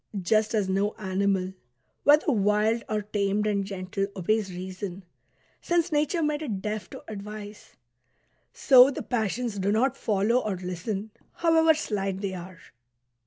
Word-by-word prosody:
Just 215 +4 +1
as 205 -3 +1
no 195 +2 0
animal, 190 -2 -1 0.5
whether 295 +1 +5
wild 210 +1 +2
or 215 -1 -1
tamed 205 0 0
and 205 -2 +1
gentle, 195 0 -3
obeys 200 +2 0
reason, 185 +1 -6 0.6
since 345 0 +1
nature 305 +3 +1
made 300 0 0
it 225 -11 -3
deaf 210 +1 -4
to - - -10
advice; 210 0 -9 0.8
so 260 -1 +7
the 280 - -5
passions 225 -2 -2
do 195 +2 +1
not 245 +5 +2
follow 215 +2 +1
or 215 -5 -2
listen, 185 +4 -4 0.2
however 325 -1 +4
slight 195 -9 -2
they 195 -2 -2
are. 180 0 -8
210 Hz, 140 wpm, -27 LUFS, 195-235 Hz, 0.8 s, so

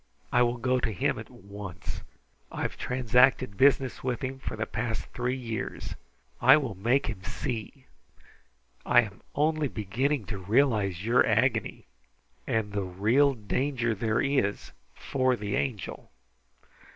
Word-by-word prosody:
I 125 - +5
will 120 0 +2
go 130 +1 +1
to 115 - -1
him 100 - 0
at - - -9
once. 100 -2 -8 0.5
I - - -4
have - - -2
transacted 125 -2 +2
business 135 +1 +3
with 125 +1 -2
him 130 +1 -4
for - - -5
the 110 0 -2
past 110 0 -3
three 125 +1 -1
years. 115 -5 -5 0.5
I 130 +4 +8
will 135 -8 -2
make 120 +9 +1
him 100 -4 -5
see! 125 +6 -5 1.0
I 120 - +6
am 105 -3 -8
only 155 0 +2
beginning 120 +4 -1
to 100 -1 -5
realize 105 -3 +1
your 120 +2 +5
agony, - - +1 0.6
and 110 -2 -1
the 100 - 0
real 110 +10 +2
danger 120 +2 -1
there 110 +2 0
is 135 -8 0 0.2
for 130 -2 +1
the 105 -3 -3
Angel. 115 -9 -3
120 Hz, 140 wpm, -28 LUFS, 105-130 Hz, 1.0 s, I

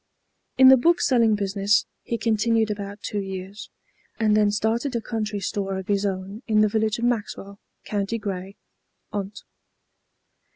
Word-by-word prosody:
In 260 0 +9
the 265 - +8
bookselling 245 -7 +3
business 200 0 +1 0.2
he 235 - -3
continued 225 -1 +1
about 205 0 -6
two 205 - -3
years, 190 +1 -7 0.5
and 215 -2 +3
then 210 -1 +4
started 225 +5 -1
a - - +1
country 215 -2 -3
store 195 0 -3
of 190 +2 -7
his 200 0 +1
own 195 +3 -5
in 215 -1 +3
the 215 - +5
village 220 0 0
of 235 - -1
Maxwell, 205 -4 -3 0.3
County 205 +2 -2
Grey, 195 -2 -6 0.6
Ont. 205 0 -5
210 Hz, 150 wpm, -24 LUFS, 200-225 Hz, 0.6 s, In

